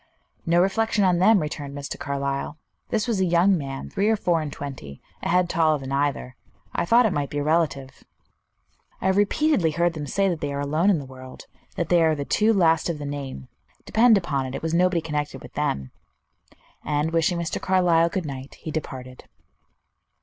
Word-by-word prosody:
"No 170 +1 +4
reflection 210 +2 +1
on 180 -2 +3
them," 210 +3 +5
returned 145 -3 -5
Mr. 140 0 -6
Carlyle. 140 +1 -3 0.3
"This 220 +1 -1
was 225 -5 0
a - - +3
young 175 +3 +4
man, 135 -4 -5
three 200 +2 0
or 220 - +4
four 175 -5 0
and 150 -2 -5
twenty, 130 - -8 0.2
a - - -3
head 180 0 +3
taller 160 -2 +2
than 135 -1 -7
either. 140 -2 -1 0.4
I 170 - -1
thought 235 +6 +5
it 210 - +1
might 145 -2 -2
be 145 - -5
a 145 - 0
relative." 145 -4 -1 1.0
"I - - -7
have 190 0 +3
repeatedly 205 - +2
heard 170 +2 +1
them 150 -3 -6
say 195 +7 +1
that 175 -4 -2
they 145 - -2
are 140 - -3
alone 155 +7 +1
in 195 - +4
the 140 - -6
world; 130 0 -12 0.3
that 170 - -2
they 175 -1 +4
are 160 -1 +3
the 140 -1 -4
two 215 +8 +2
last 165 -6 +3
of 165 - -2
the 145 - -6
name. 140 - -6 0.4
Depend 225 -1 +5
upon 140 -8 -2
it, 130 - -6
it - - -6
was 160 0 -2
nobody 180 0 +2
connected 150 -2 -3
with - - -12
them;" 70 - -2 0.9
and 150 +2 -1
wishing 165 +1 +1
Mr. 170 -1 -3
Carlyle 175 -3 +3
good 185 -1 -3
night, 135 -1 -7
he 160 - -7
departed. 130 -5 -6
160 Hz, 200 wpm, -24 LUFS, 140-180 Hz, 1.0 s, them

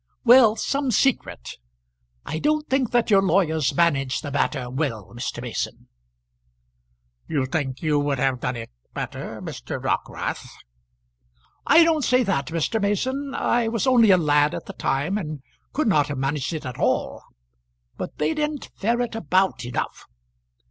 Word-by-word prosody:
"Well; 240 -3 +7
some 275 +3 -1
secret. 245 - 0 0.7
I 160 - -3
don't 305 - +1
think 260 -3 +1
that 240 -2 +1
your 195 -1 +6
lawyers 160 -7 +1
managed 140 -6 +1
the 145 - -5
matter 135 -2 -1
well, 125 - -3
Mr. 120 - -5
Mason." - - -5 1.4
"You 140 -4 0
think 135 +1 -3
you 150 -2 +2
would 145 -1 0
have 130 -1 0
done 125 +1 -2
it 115 - -7 0.2
better, - - -5
Mr. - - -6
Dockwrath?" - - -3 1.2
"I 320 +3 +7
don't 320 -3 +2
say 255 0 +3
that, 190 - -1
Mr. 165 +8 -1
Mason. 260 +8 -1
I 235 -1 +1
was 230 +2 -1
only 245 -4 +5
a 185 - +7
lad 150 -2 +2
at - - -6
the - - -8
time, 150 +10 -1
and 155 -7 -6 0.3
could 305 -2 0
not 150 -8 +3
have 145 - -4
managed 135 +2 -1
it 155 -2 -5
at 125 -2 -6
all. - - 0 0.7
But - - -6
they 150 +1 +1
didn't 300 -1 -3
ferret 235 +3 0
about 190 -4 +1
enough. 120 - -4
170 Hz, 155 wpm, -23 LUFS, -, 1.4 s, Well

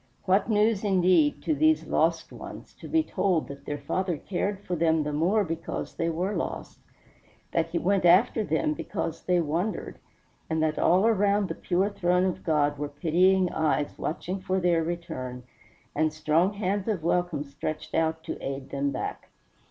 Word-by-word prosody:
What 195 +5 +2
news 215 -1 +2
indeed, 195 - +3
to 315 - +1
these 315 +1 +3
lost - - +1
ones, - - -10
to - - -9
be 320 0 +2
told 185 - 0
that 140 0 -9
their 145 - -3
Father 175 +4 -2
cared 195 +4 -2
for 180 - -2
them 160 -1 +2
the 150 0 -3
more 185 +8 +2
because 165 -2 -4
they 165 - -1
were 180 +5 -1
lost; - - -4 0.7
that - - +1
he - - -2
went 195 -1 +1
after 185 +6 +5
them 155 -3 0
because 160 +2 -4
they 180 -1 +2
wandered; 170 +6 -2 0.5
and 160 0 0
that 155 -1 0
all 185 +5 +4
around 205 -2 +2
the - - -2
pure 190 +3 0
throne 180 -1 +2
of 185 - -2
God 145 -3 +1
were 145 0 -3
pitying 180 +5 +2
eyes 155 -2 0
watching 180 +4 -3
for 190 0 -1
their 175 -2 +2
return, 130 -7 -5 0.5
and 155 0 +1
strong 155 +5 +1
hands 200 0 -2
of 200 -8 -1
welcome 170 -3 0
stretched 150 +2 -6
out 160 0 0
to - - -6
aid 135 0 -5
them 140 0 0
back. - - -5
175 Hz, 175 wpm, -27 LUFS, 155-195 Hz, 0.7 s, after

